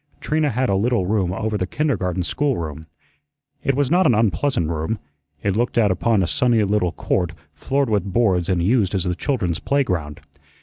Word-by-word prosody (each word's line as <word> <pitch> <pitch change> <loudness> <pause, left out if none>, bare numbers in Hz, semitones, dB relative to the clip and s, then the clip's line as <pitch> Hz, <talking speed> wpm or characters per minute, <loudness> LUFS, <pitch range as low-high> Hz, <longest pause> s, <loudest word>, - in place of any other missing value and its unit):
Trina 155 -1 0
had 130 +2 0
a 100 - +1
little 115 0 +1
room 95 -2 0
over 105 +2 -2
the 90 - -1
kindergarten 95 - -1
schoolroom. 85 - -2 0.8
It 135 - +1
was 140 0 0
not 180 +2 +4
an 120 - +4
unpleasant 105 - +1
room. 80 +7 -2 0.5
It 100 -1 0
looked 120 +2 0
out 105 -4 +4
upon 105 +1 +2
a - - -1
sunny 120 -3 +2
little 100 -3 +1
court 90 -2 -1 0.2
floored 135 - -1
with 100 -3 0
boards 95 -5 +2
and 90 -2 +1
used 105 -1 +2
as 95 - 0
the 90 -1 -1
children's 95 - -1
playground. 90 - -1
105 Hz, 180 wpm, -21 LUFS, 90-125 Hz, 0.8 s, not